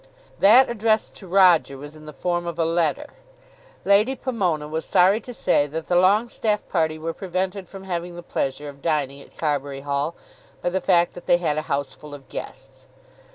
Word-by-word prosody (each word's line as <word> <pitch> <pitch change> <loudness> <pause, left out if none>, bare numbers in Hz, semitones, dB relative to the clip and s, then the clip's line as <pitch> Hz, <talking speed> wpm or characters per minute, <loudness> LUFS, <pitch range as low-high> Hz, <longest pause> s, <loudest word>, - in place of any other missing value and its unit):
That 240 +7 +7
addressed 220 -1 0
to 190 - -11
Roger 180 -6 +4
was 145 +3 -10
in 155 0 -13
the - - -7
form 175 +3 -2
of 170 -1 -4
a 165 - +1
letter. 170 - 0 0.8
Lady 210 +7 +4
Pomona 185 - -1
was 160 +1 -3
sorry 190 +4 +4
to 250 - -9
say 145 -10 +1
that 160 +2 -5
the 175 - +2
Longestaffe 210 +3 +2
party 160 -3 0
were 165 +1 -4
prevented 185 +1 -3
from 195 -1 -10
having 175 -2 -4
the 175 - -9
pleasure 145 -2 -3
of 140 -1 -10
dining 140 -4 -1
at - - -18
Carbury 145 -3 -2
Hall 145 +3 -2 0.4
by 175 - -2
the 190 +1 -1
fact 175 -2 +3
that 175 - -12
they 175 - +5
had 170 -4 -1
a 155 - -8
house 140 -1 -1
full 145 +2 -11
of 135 -2 -15
guests. - - -9
170 Hz, 195 wpm, -23 LUFS, 150-190 Hz, 0.8 s, That